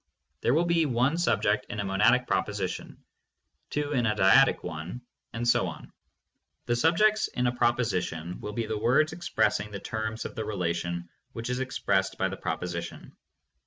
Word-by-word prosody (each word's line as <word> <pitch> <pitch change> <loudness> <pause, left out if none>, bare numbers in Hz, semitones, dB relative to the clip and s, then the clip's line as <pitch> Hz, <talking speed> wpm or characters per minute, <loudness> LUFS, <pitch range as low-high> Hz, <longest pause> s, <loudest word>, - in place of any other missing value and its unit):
There 120 - +2
will 170 +2 +3
be 170 -2 +2
one 125 +4 +2
subject 105 -11 +1
in 105 - -5
a 100 - -1
monadic 110 +6 +3
proposition, 95 -1 -3 0.7
two 145 0 -2
in 120 -4 +2
a 105 - +1
dyadic 95 -2 +5
one, 80 +10 -6 0.3
and 120 +1 -3
so 120 - +3
on. - - -9 0.7
The 120 - +1
subjects 190 - +3
in 125 - -2
a 120 0 +1
proposition 90 -9 0
will 105 - -5
be 115 +1 -2
the 110 -1 -3
words 135 +8 +3
expressing 160 -9 0
the 100 -1 -6
terms 110 +2 -4
of - - -5
the 110 - -4
relation 85 -3 -2 0.3
which 115 +1 -4
is 125 - -1
expressed 95 -7 0
by 95 - +1
the 95 - -5
proposition. 85 +1 -5
110 Hz, 165 wpm, -28 LUFS, 95-125 Hz, 0.7 s, dyadic